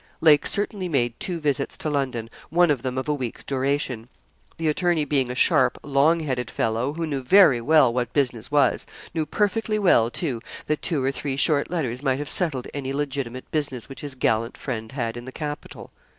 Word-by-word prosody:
Lake 150 Hz, -3 st, +5 dB
certainly 200 Hz, -2 st, 0 dB
made 120 Hz, -6 st, +1 dB
two 175 Hz, -3 st, -3 dB
visits 145 Hz, -4 st, -1 dB
to 190 Hz, -, -4 dB
London, 135 Hz, -6 st, -1 dB, 0.2 s
one 170 Hz, +1 st, +4 dB
of 135 Hz, -5 st, 0 dB
them 130 Hz, 0 st, -3 dB
of 130 Hz, -, -2 dB
a 150 Hz, -, +2 dB
week's 130 Hz, -5 st, -5 dB
duration. 135 Hz, -3 st, -1 dB, 0.5 s
The 165 Hz, -, -1 dB
attorney 165 Hz, 0 st, +1 dB
being 135 Hz, -3 st, 0 dB
a 125 Hz, -, -4 dB
sharp, 130 Hz, -3 st, +3 dB
long 145 Hz, +4 st, +3 dB
headed 130 Hz, -5 st, -2 dB
fellow, 115 Hz, +5 st, -1 dB
who 165 Hz, +1 st, -3 dB
knew 140 Hz, -4 st, -3 dB
very 135 Hz, -3 st, +6 dB
well 140 Hz, -2 st, +4 dB
what 125 Hz, -1 st, -1 dB
business 125 Hz, -6 st, -1 dB
was, 145 Hz, -1 st, +2 dB, 0.3 s
knew 160 Hz, -2 st, -1 dB
perfectly 215 Hz, +5 st, 0 dB
well, 170 Hz, -, +4 dB
too, 125 Hz, -4 st, -3 dB, 0.2 s
that 150 Hz, -, -1 dB
two 150 Hz, -6 st, -1 dB
or 135 Hz, -, +1 dB
three 140 Hz, 0 st, -3 dB
short 145 Hz, +1 st, +2 dB
letters 130 Hz, -8 st, -2 dB
might 135 Hz, -2 st, +1 dB
have 145 Hz, 0 st, -3 dB
settled 150 Hz, -9 st, +1 dB
any 135 Hz, -2 st, -4 dB
legitimate 135 Hz, -3 st, -3 dB
business 140 Hz, -6 st, -2 dB
which 135 Hz, -, -9 dB
his 145 Hz, -2 st, -4 dB
gallant 115 Hz, -2 st, 0 dB
friend 110 Hz, -1 st, -5 dB
had 115 Hz, -4 st, -2 dB
in 120 Hz, 0 st, -8 dB
the 130 Hz, -, -7 dB
capital. 150 Hz, +1 st, -7 dB
140 Hz, 195 wpm, -24 LUFS, 125-155 Hz, 0.5 s, very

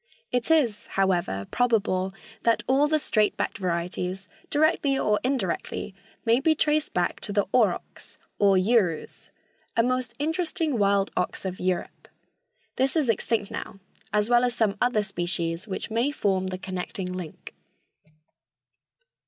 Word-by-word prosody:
It 245 Hz, +2 st, 0 dB
is, 270 Hz, -10 st, +2 dB
however, 175 Hz, -, 0 dB
probable 205 Hz, -6 st, +1 dB, 0.3 s
that 230 Hz, -1 st, +2 dB
all 275 Hz, +3 st, +3 dB
the 310 Hz, +1 st, +2 dB
straight 215 Hz, -7 st, +1 dB
backed 225 Hz, -, -2 dB
varieties, 180 Hz, +1 st, -2 dB, 0.2 s
directly 295 Hz, -2 st, +2 dB
or 210 Hz, -5 st, +2 dB
indirectly, 215 Hz, -5 st, -2 dB, 0.3 s
may 230 Hz, +2 st, +4 dB
be 315 Hz, +3 st, +3 dB
traced 305 Hz, 0 st, +1 dB
back 175 Hz, 0 st, 0 dB
to -, -, -4 dB
the 205 Hz, 0 st, +2 dB
aurochs, 215 Hz, -8 st, 0 dB, 0.2 s
or 200 Hz, -2 st, +5 dB
urus, 185 Hz, -4 st, +1 dB, 0.5 s
a 230 Hz, -, +5 dB
most 250 Hz, -1 st, -1 dB
interesting 315 Hz, -3 st, -1 dB
wild 200 Hz, -1 st, +2 dB
ox 180 Hz, -, -2 dB
of 185 Hz, -1 st, -4 dB
Europe. 180 Hz, -1 st, -2 dB, 0.7 s
This 265 Hz, +4 st, +1 dB
is 300 Hz, -6 st, +2 dB
extinct 220 Hz, -1 st, 0 dB
now, 195 Hz, -, -6 dB, 0.3 s
as 210 Hz, 0 st, +2 dB
well 240 Hz, 0 st, +4 dB
as 245 Hz, -1 st, +1 dB
some 215 Hz, -4 st, +1 dB
other 245 Hz, -4 st, +2 dB
species 175 Hz, -1 st, -2 dB
which 200 Hz, +3 st, -4 dB
may 235 Hz, +5 st, +2 dB
form 190 Hz, -9 st, 0 dB
the 185 Hz, 0 st, -3 dB
connecting 185 Hz, 0 st, -5 dB
link. 180 Hz, -4 st, -8 dB
210 Hz, 140 wpm, -26 LUFS, 185-250 Hz, 0.7 s, or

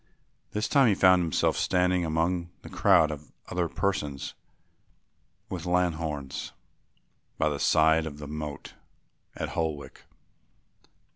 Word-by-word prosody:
This 105 Hz, +1 st, -2 dB
time 140 Hz, -3 st, +4 dB
he 105 Hz, -, +3 dB
found 95 Hz, -1 st, +5 dB
himself 80 Hz, -4 st, +1 dB
standing 90 Hz, -1 st, +1 dB
among 85 Hz, +2 st, 0 dB
a -, -, -9 dB
crowd 80 Hz, -1 st, +4 dB
of 75 Hz, 0 st, -9 dB, 0.2 s
other 85 Hz, -2 st, -1 dB
persons 75 Hz, -9 st, -2 dB, 1.1 s
with -, -, -5 dB
lanthorns 80 Hz, -6 st, -1 dB, 0.8 s
by -, -, +2 dB
the 70 Hz, -1 st, -3 dB
side 80 Hz, +1 st, +3 dB
of 75 Hz, -2 st, -7 dB
the 75 Hz, -1 st, -8 dB
moat 75 Hz, -1 st, -6 dB, 0.6 s
at -, -, -4 dB
Holwick. 80 Hz, -4 st, -4 dB
80 Hz, 120 wpm, -27 LUFS, 75-90 Hz, 1.1 s, found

